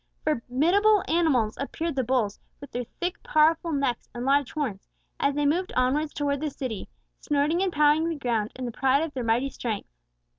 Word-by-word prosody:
Formidable 330 - +3
animals 285 -10 +2
appeared 320 +3 -3
the 260 - +1
bulls, 235 -5 0 0.2
with 280 - -11
their 245 0 -3
thick, 355 +1 -2
powerful 325 +2 +3
necks 275 -5 -1
and 240 +1 -4
large 280 -1 +2
horns, 250 -11 -3 0.3
as 280 0 +1
they 295 0 +1
moved 345 +6 +1
onwards 280 +5 +1
towards 285 -1 -1
the 310 - -1
city, 255 -7 -5 0.3
snorting 295 +4 +1
and 385 -1 +1
pawing 300 +1 +3
the 330 - -2
ground 235 -6 -1
in 255 - -5
the 240 - -3
pride 270 +5 +2
of 325 -3 -4
their 255 - -3
mighty 235 +4 +1
strength. 225 -5 -4
280 Hz, 185 wpm, -26 LUFS, 250-315 Hz, 0.3 s, Formidable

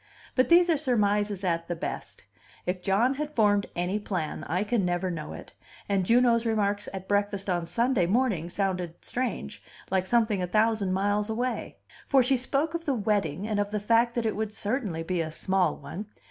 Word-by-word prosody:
But 255 - +2
these 345 +1 +7
are 330 -3 +3
surmises 210 -7 +1
at 170 -2 0
the 175 - -2
best: - - -6 0.4
if 180 0 -2
John 205 +8 +2
had 300 +2 -5
formed 205 -3 +3
any 180 +4 -1
plan, 180 -7 -3
I 180 +6 0
can 215 -1 0
never 180 +1 0
know 165 -3 -5
it, - - -10 0.3
and 195 -2 +1
Juno's 235 -1 +4
remarks 205 -2 0
at 190 -1 -7
breakfast 200 -1 0
on 175 -2 -1
Sunday 235 -2 +2
morning 200 -6 +1
sounded 180 -3 -2
strange, 235 - -3 0.3
like 190 -1 +1
something 220 -3 +2
a 180 - -1
thousand 215 0 +2
miles 205 +3 +1
away. 245 +3 -2 0.3
For 270 -3 +5
she 265 +2 +3
spoke 275 +5 -1
of 335 0 -4
the 280 - +1
wedding, 205 -5 0
and 215 -2 0
of 205 0 0
the 210 0 -2
fact 230 +3 +2
that 235 -2 0
it 220 - 0
would 215 0 -2
certainly 210 -6 -2
be 175 0 -1
a 160 -1 -3
small 190 +3 +1
one. 205 +3 -7
205 Hz, 190 wpm, -27 LUFS, 185-235 Hz, 0.4 s, these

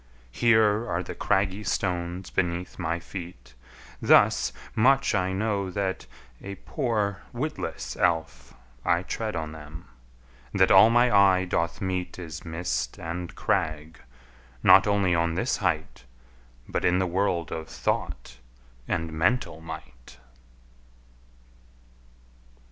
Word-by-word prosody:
Here 110 - +3
are 90 +1 -1
the - - -7
craggy 100 +1 0
stones 90 -1 -2
beneath 90 +1 -2
my 85 -2 -1
feet, 85 -9 -9 0.5
Thus 60 -1 +4 0.2
much 135 +5 +3
I 90 0 +1
know 100 -1 -1
that, 95 0 -3 0.3
a 100 0 -7
poor 100 -4 -2
witless 150 +6 -4
elf, 80 -8 -1 0.3
I 85 +1 +2
tread 110 +1 -4
on 80 -1 -3
them, 80 +1 -10 0.7
that 95 -1 +4
all 95 +4 +8
my 120 -1 +4
eye 95 -2 +5
doth 85 -2 -1
meet 95 -2 -3
Is 80 -4 -7
mist 80 -7 -3
and 85 +1 -6
crag, 80 0 -1 0.6
not 95 +1 +7
only 100 -3 +2
on 85 -1 +1
this - - 0
height, 65 - -2 0.6
But - - -2
in 90 +1 +3
the 95 - +1
world 90 -2 -1
of 80 -2 -5
thought - - -3 0.5
and 80 -1 -2
mental 85 0 0
might! 65 -7 -10
90 Hz, 120 wpm, -26 LUFS, 80-100 Hz, 0.7 s, all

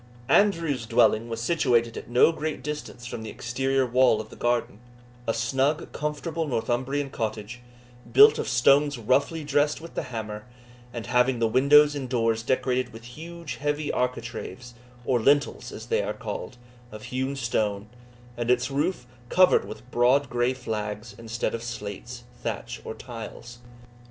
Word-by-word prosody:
Andrew's 165 - +2
dwelling 115 -1 +3
was 115 0 -4
situated 120 -4 +2
at - - -8
no 125 +6 +5
great 155 -4 -4
distance 150 -4 -6
from 120 -2 -6
the 110 - -6
exterior 135 +2 0
wall 125 -2 +4
of 110 0 -7
the - - -10
garden 120 -3 -1 0.5
a - - +3
snug 135 +7 0
comfortable 155 +2 -3
Northumbrian 130 +3 -1
cottage, 110 +1 -4 0.5
built 430 +1 +8
of - - -2
stones 140 +3 +4
roughly 140 +7 +1
dressed 145 +1 +1
with 165 +1 -11
the - - -2
hammer, 110 -2 -6 0.4
and 115 -1 -6
having 125 +1 +2
the 115 -1 +2
windows 145 +5 +6
and 135 -3 -5
doors 115 -2 +1
decorated 130 +1 0
with 115 0 -11
huge 170 +1 -7
heavy 145 +1 -1
architraves, 125 0 -4 0.3
or 125 -2 +2
lintels, 145 +5 +2
as - - -8
they 460 +1 +1
are - - -2
called, 125 - -6 0.3
of 110 0 -9
hewn 130 +2 -2
stone, 105 -5 -1 0.5
and 120 0 -3
its 125 +2 +2
roof 145 0 -1 0.2
covered 185 0 +5
with 125 - -10
broad 125 +3 +3
grey 120 +1 +1
flags, 110 -2 -4
instead 115 +1 -3
of 115 - -3
slates, 120 +1 -7 0.2
thatch, 115 +1 -4
or - - -6
tiles. 120 0 -9
125 Hz, 155 wpm, -26 LUFS, 115-145 Hz, 0.5 s, built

